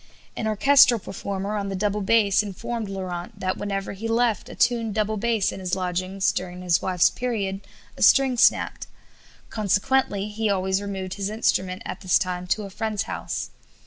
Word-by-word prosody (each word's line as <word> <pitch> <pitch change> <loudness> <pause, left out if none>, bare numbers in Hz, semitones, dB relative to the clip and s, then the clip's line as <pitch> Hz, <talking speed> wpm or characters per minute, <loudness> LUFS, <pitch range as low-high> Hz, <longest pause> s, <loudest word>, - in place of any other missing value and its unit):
An 220 - -2
orchestral 250 +3 +5
performer 200 +1 -4
on 200 -1 -2
the 195 - -3
double 205 +2 -1
bass 205 0 +3
informed 215 +2 -5
Laurent 190 +2 -6
that 185 -1 -1
whenever 195 -1 -3
he 210 +3 -5
left 230 -1 +1
a - - -9
tuned 230 -3 +1
double 215 0 0
bass 220 -1 +1
in - - -7
his 185 -1 -2
lodgings 185 +1 -1
during 180 0 -5
his 175 -1 +2
wife's 185 -2 +3
period 205 -6 -3 0.3
a - - -11
string 270 -2 +5
snapped; 235 - +2 0.6
consequently 205 0 +1
he 215 +1 -2
always 190 0 0
removed 190 -2 -4
his 200 0 -3
instrument 190 -4 0
at - - -6
this 185 -3 +3
time 180 -2 -3
to 210 +4 0
a 200 - -8
friend's 220 0 -2
house. - - -5
200 Hz, 175 wpm, -24 LUFS, 190-220 Hz, 0.6 s, orchestral